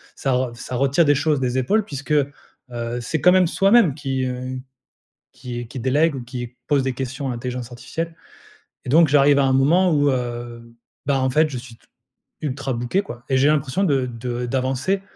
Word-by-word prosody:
ça 130 -2 0
ça 120 +1 -7
retire 140 +6 +3
des 145 -1 +4
choses 150 0 +1
des 125 0 0
épaules 205 - +2
puisque, 145 -1 -7
heu, 145 -1 +2 0.7
c'est 155 +6 -2
quand 180 - +6
même 185 -2 +4
soi-même 195 - +4
qui, 135 -3 -2
heu, 130 +1 -4 0.7
qui 120 -1 -7
qui 125 - -7
délègue 145 +6 +2
ou 125 - -6
qui 120 0 -7
pose 140 -2 +2
des 130 -1 -1
questions 135 +2 -4
à - - -1
l'intelligence 125 0 -5
artificielle 165 +7 -5 0.7
et - - -5
donc 160 +3 +6
j'arrive 140 0 +5
à 135 - +3
un 130 - +2
moment 170 +7 +4
où, 145 -1 +3
heu, 120 -2 -5 0.3
bah, 135 -1 +1
en 130 - +1
fait, 155 +4 +3
je 130 - -5
suis 120 -1 -10
t - - -29 0.6
ultra 135 -2 -3
booké 120 +11 0
quoi. 120 -10 -9
Et 130 - +3
j'ai 135 - +4
l'impression 150 +5 +1
de 135 -5 +1
de 120 +1 -4
d'avancer, 135 +9 -1
135 Hz, 195 wpm, -22 LUFS, 125-150 Hz, 0.7 s, quand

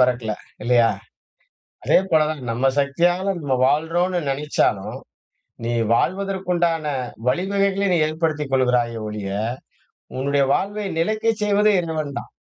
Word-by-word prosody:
பெறக்கல 125 -4 +2 0.3
இல்லையா? 120 -1 +4 0.9
அதே - - +5
போல 155 -1 +5
தான் 155 -3 -5
நம்ம 120 +4 0
சக்தியால 175 +7 +1
நம்ம 140 -3 0
வாழறோம்னு 170 +5 +1
நெனச்சாலும் 130 -6 0 0.7
நீ 120 - -1 0.2
வாழ்வதற்கு 190 +5 -1
உண்டான 165 -3 +1 0.4
வழிவகைகளை 195 +5 +1
நீ - - +3
ஏற்படுத்திக் 155 -2 -2
கொள்கிறாயே 125 -3 +2
ஒழிய, 105 -2 -5 0.9
உன்னுடைய 140 +1 +1
வாழ்வை 205 +2 -2
நிலைக்கச் 215 +5 0
செய்வது 210 +1 +3
இறைவன் 155 -4 -3
தான். - - -10
155 Hz, 115 wpm, -22 LUFS, 130-185 Hz, 0.9 s, அதே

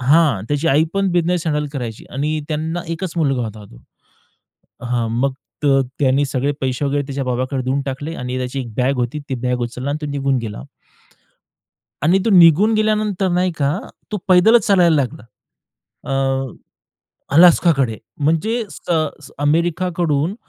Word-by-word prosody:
हां, 140 - +3
त्याची 145 +2 -1
आई 150 +3 +4
पण 195 0 +1
बिझनेस 175 -1 0
हँडल 150 -1 0
करायची 120 -6 -5
आणि 150 +3 -1
त्यांना 160 +2 -2
एकच 165 +1 -4
मुलगा 135 -6 +1
होता 110 -1 -8
तो. - - -15 1.1
हां, 120 -1 -1
मग 135 +1 +1 0.3
तर 135 -2 +4 0.2
त्यांनी 135 +1 +2
सगळे 135 +1 -1
पैसे 130 +1 -1
वगैरे 140 +1 0
त्याच्या 135 0 -4
बाबांकडे 130 +1 -2
देऊन 135 +2 0
टाकले 145 +4 -4
आणि 125 +1 -4
त्याची 130 +2 -3
एक 120 -4 -6
बॅग 130 +2 +2
होती, 125 +4 -2
ती 130 - -1
बॅग 125 0 -1
उचलला 125 +3 -4
आणि 145 - -1
तो 150 - -4
निघून 135 -2 0
गेला. 110 - -6 1.4
आणि 175 +5 +4
तो 225 - +2
निघून 180 +3 +6
गेल्यानंतर 215 -3 +1
नाही 180 0 +1
का, 145 +4 +1 0.3
तो - - 0
पैदलच 190 +5 +5
चालायला 175 -5 +4
लागला. 130 -6 -2 0.9
अ, 135 -1 0 0.8
अलास्काकडे. 160 -8 +5 0.3
म्हणजे 215 +10 +1
स 155 -4 -3
अमेरिकाकडून 170 +1 0
145 Hz, 150 wpm, -19 LUFS, 130-170 Hz, 1.4 s, निघून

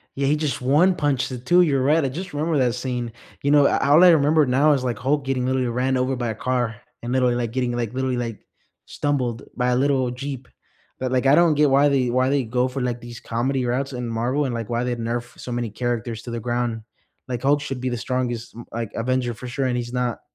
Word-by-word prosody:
Yeah, 135 0 0
he 150 - +3
just 150 -4 -2
one-punched 145 -1 +2
the 130 - -5
2, 175 +9 +3
you're 140 -6 +2
right, 150 +3 +3
I 135 - 0
just 180 +5 -6
remember 155 +1 0
that 125 -2 +2
scene, 125 -2 -3 0.3
you 140 - +2
know, 145 -1 +6
I - - +1
all 155 +5 +7
I 180 - +9
remember 155 -1 +4
now 140 +4 +4
is, 130 -2 -1
like, 120 -4 -2
Hulk 140 +2 0
getting, 130 -2 -1
literally, 130 -1 0
ran 130 +2 0
over 130 0 0
by 120 -2 -2
a 110 - -3
car 120 -2 -1 0.3
and, 120 +2 -3
literally, 125 -2 +2
like, 120 -2 -2
getting, 125 -1 -1
like, 120 -1 -2
literally, 130 -1 -1
like, 115 -3 -5 0.4
stumbled 130 -4 -2
by 125 -1 0
a 125 - +2
little 130 -2 +1
jeep, 130 -1 -6 0.5
but, 130 0 -2
like, 130 +1 +1
I 140 - +6
don't 170 -3 +4
get 150 -1 +4
why 140 +2 +5
they 130 -3 +2
why 130 +1 +2
they 140 -2 +1
go 125 +3 0
for, 130 +1 -4
like, 120 -1 -2
these 120 -1 -10
comedy 130 +3 -1
routes 135 +3 -1
in 125 -1 -4
Marvel 125 +6 0
and, 130 -3 -2
like, 115 -1 -4
why 120 +1 0
they 125 -1 -1
nerf 120 +1 -4
so 125 - -7
many 120 -2 -2
characters 120 0 -3
to 120 - -7
the 115 -1 -4
ground, 120 -1 -2 0.5
like, 120 -2 -3
Hulk 145 +1 +2
should 135 -3 -4
be 130 0 -2
the 120 - -2
strongest, 120 -1 -3
m 120 +1 -10
like, 115 -2 -4
Avenger 125 0 -1
for 125 +3 -9
sure, 130 +2 -2
and 125 -1 0
he's 120 0 -4
not. 125 -2 -1
125 Hz, 250 wpm, -23 LUFS, 120-140 Hz, 0.5 s, I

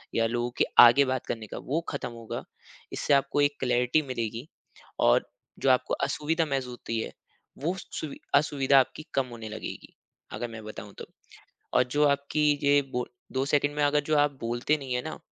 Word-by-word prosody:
या 115 - +3
लोगों 120 +1 -1
के - - +4
आगे 120 +4 +9
बात 130 -1 -2
करने 110 -2 -4
का - - -7
वो 150 +5 -2
ख़त्म 140 - -4
होगा, 115 -1 -6 0.5
इससे 145 - +1
आपको 140 +1 +2
एक 145 0 +2
क्लैरिटी 125 +3 +2
मिलेगी 115 +1 -4 0.5
और - - +4 0.3
जो 135 - +2
आपको 130 - +1
असुविधा 160 +4 0
महसूस 135 -4 -2
होती 115 -2 -4
है - - -6 0.5
वो 175 +4 0
स 190 - -10
सुवि 150 -3 -6 0.2
असुविधा 140 -2 +4
आपकी 145 +4 -2
कम 135 -1 +1
होने 115 -2 -7
लगेगी, 110 - -8 0.4
अगर 120 - -3
मैं 115 -1 -8
बताऊ 110 - -8
तो। - - -7 0.7
और - - +5
जो 150 +1 +3
आपकी 145 +2 +1
ये 145 0 +5
बोल 125 0 -2 0.2
2 130 0 0
सेकंड 145 0 +1
में 150 - +2
अगर 145 0 +3
जो 155 - +2
आप 145 -2 +2
बोलते 120 +6 0
नहीं 135 -3 -4
है 125 - -1
ना 155 - -6
135 Hz, 190 wpm, -27 LUFS, 120-145 Hz, 0.7 s, आगे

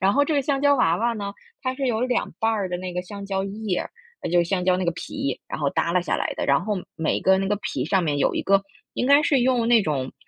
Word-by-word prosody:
然 195 +1 +3
后 285 +1 +4
这 315 - -1
个 285 - +3
香 275 0 -1
蕉 285 0 +5
娃 170 -8 +3
娃 235 +3 0
呢， 200 -2 -4 0.3
它 255 0 -1
是 270 0 -2
有 225 -3 0
2 250 -1 0
瓣 225 - +2
儿 205 -4 -1
的 180 - -2
那 185 -1 -5
个 180 - -1
香 200 +2 -8
蕉 195 -1 -1
叶 200 -2 -2 0.4
呃， - - -2
就 175 - +3
是 170 - +4
香 180 +1 -1
蕉 185 -1 +3
那 185 - -2
个 170 - +2
皮， 135 -4 -4
然 - - -5
后 140 -2 0
耷 170 - 0
拉 180 - +3
下 - - -1
来 - - -2
的， - - -2
然 140 +3 +3
后 210 +2 -1 0.2
每 160 -1 0
个 190 0 +4
那 195 0 -1
个 205 - +1
皮 135 -9 -3
上 190 +2 +2
面 145 -3 0
有 - - +2
一 - - -1
个 195 0 +3 0.3
应 250 - -1
该 285 +2 +6
是 285 -4 +3
用 245 -2 +2
那 235 -1 +5
种， 140 -8 -2
200 Hz, 310 characters per minute, -24 LUFS, 180-240 Hz, 0.4 s, 该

